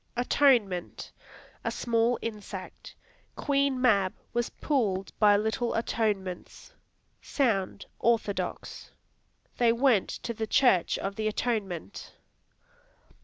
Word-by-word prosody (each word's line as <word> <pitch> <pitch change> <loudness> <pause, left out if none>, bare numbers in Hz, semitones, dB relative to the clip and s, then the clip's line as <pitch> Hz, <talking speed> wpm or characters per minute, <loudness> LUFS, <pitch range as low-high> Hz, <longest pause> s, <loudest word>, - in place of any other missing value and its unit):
Atonement 240 -8 +1 0.5
A - - -1
small 235 0 +1
insect; 215 -3 -7 0.4
"Queen 280 -2 +1
Mab 200 -7 +3 0.2
was 240 0 0
pulled 200 -10 -1
by 205 -1 +6
little 220 +3 -1
atonements." 210 - -3 0.5
Sound, 220 -9 -1
[orthodox]; 225 -4 -1 0.7
"They 235 -1 +5
went 235 -4 +2
to 235 - -5
the 220 0 -4
church 215 -8 +3
of 195 0 -4
the 215 0 -1
Atonement." 205 -6 -3
225 Hz, 95 wpm, -28 LUFS, 200-245 Hz, 0.7 s, by